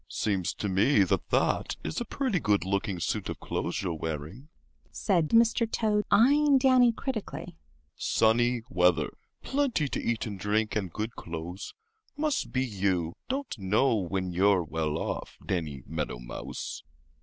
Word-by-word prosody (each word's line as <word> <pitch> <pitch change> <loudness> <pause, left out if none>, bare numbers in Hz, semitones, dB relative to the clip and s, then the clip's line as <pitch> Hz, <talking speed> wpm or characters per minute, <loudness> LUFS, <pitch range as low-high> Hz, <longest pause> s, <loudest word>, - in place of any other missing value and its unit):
"Seems 95 -5 -1
to 105 - -3
me 100 +4 +4
that 90 - -1
that - - +1
is - - -3
a - - -2
pretty 255 -9 -1
good 105 - +1
looking 100 -1 -1
suit - - -2
of - - -5
clothes - - -3
you're 90 -3 -1
wearing," 80 - -5 0.4
said 170 -5 +1
Mr. 230 0 +4
Toad, 210 -2 +1
eyeing 285 +5 +5
Danny 255 -2 +5
critically. 220 -7 -5 0.4
"Sunny 120 +1 +2
weather, 90 -7 +3 0.3
plenty 265 - +1
to - - -2
eat 115 -1 -1
and 100 -4 -6
drink, 105 +2 0
and 95 -5 -1
good 110 +6 -4
clothes—must 290 - -5
be 130 0 +1
you 95 -7 0 0.2
don't 270 0 -2
know 105 +8 +2
when 95 -2 -1
you're 95 +1 +3
well 80 -1 -2
off, - - -4
Danny 75 -8 -3
Meadow 75 -5 -3
Mouse." - - -6
105 Hz, 145 wpm, -28 LUFS, -, 0.4 s, eyeing